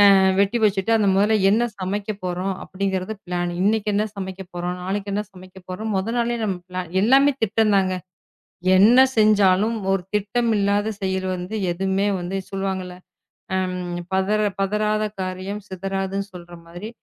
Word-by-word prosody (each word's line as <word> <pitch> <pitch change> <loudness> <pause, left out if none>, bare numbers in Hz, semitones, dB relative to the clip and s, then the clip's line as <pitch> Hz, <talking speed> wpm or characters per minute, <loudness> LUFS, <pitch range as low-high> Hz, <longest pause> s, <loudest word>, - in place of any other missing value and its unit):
அ - - +6 0.2
வெட்டி 200 +4 +2
வச்சிட்டு 200 +1 +1
அந்த 210 -2 +2
முதல்ல 210 +3 +3
என்ன 225 +3 +3 0.2
சமைக்க 200 +3 -2
போறோம் 180 +2 -2
அப்படிங்கறது 190 +1 -2
பிளான் 175 -1 -2
இன்னைக்கு 210 +2 +2
என்ன 210 +1 +2
சமைக்க 190 -1 -6
போறோம், 175 0 -3
நாளைக்கு 200 +2 -3
என்ன 210 +1 0
சமைக்க 185 0 -14
போறோம். 215 +4 -4
மொத 205 +5 -2
நாளே 240 0 0
நம் 195 -3 -1 0.5
எல்லாமே 275 +5 +5
திட்டம் 220 0 +2
தாங்க. 185 -1 +1 0.8
என்ன 230 +6 +7 0.2
செஞ்சாலும் 210 0 +4 0.2
ஒரு 195 -2 0
திட்டம் 220 +3 +1
இல்லாத 205 +2 +1
செயல் 190 -1 -1
வந்து 180 +4 -6 0.2
எதுவுமே 190 +3 0
வந்து 175 +2 -3
சொல்லுவாங்க. 195 -1 -2 0.7
ம், 180 -1 -3 0.2
பதற 195 +3 +2 0.2
பதறாத 210 +2 +1 0.2
காரியம் 185 +2 -4
சிதறாதுன்னு 195 +1 -3
சொல்ற 175 -1 -11
மாதிரி 175 +6 -8
195 Hz, 145 wpm, -22 LUFS, 185-210 Hz, 0.8 s, என்ன